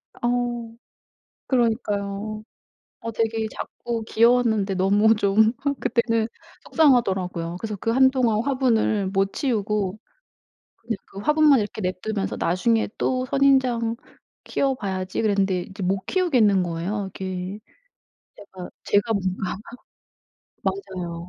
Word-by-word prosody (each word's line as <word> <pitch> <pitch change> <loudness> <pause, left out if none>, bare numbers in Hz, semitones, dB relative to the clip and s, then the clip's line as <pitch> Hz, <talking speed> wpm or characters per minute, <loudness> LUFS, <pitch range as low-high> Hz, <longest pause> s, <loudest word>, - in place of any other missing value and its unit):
어. 240 -1 -2 0.7
그러니까요. 215 -4 -1 0.6
어 230 - -5
되게 225 0 -1
작고 235 -2 -5
귀여웠는데 220 -3 +3
너무 205 +4 +4
좀 215 +1 +3 0.3
그때는 230 -2 +1 0.3
속상하더라고요. 190 - +1
그래서 215 0 -4
그 225 +4 -2
한동안 255 -3 +3
화분을 240 -7 +1
못 195 +1 0
치우고 210 -5 -1 0.8
근데 225 -1 -4
그 195 - -12
화분만 300 +4 +4
이렇게 210 +1 -4
내버려 185 0 -2
두면서 215 -3 -2
'나중에 220 +6 +1
또 255 0 0
선인장 255 -4 +2 0.5
키워 270 -1 0
봐야지.' 190 -5 -3
그랬는데 195 -4 +1
이제 190 +2 -9
못 190 +1 0
키우겠는 245 - +3
거예요. 180 +4 -3
이게 185 +1 -5 0.8
제가 190 -3 -10
제가 205 +3 +2
뭔가 190 -2 -2 1.1
맞아요. 180 - -4
215 Hz, 270 characters per minute, -23 LUFS, 195-240 Hz, 1.1 s, 너무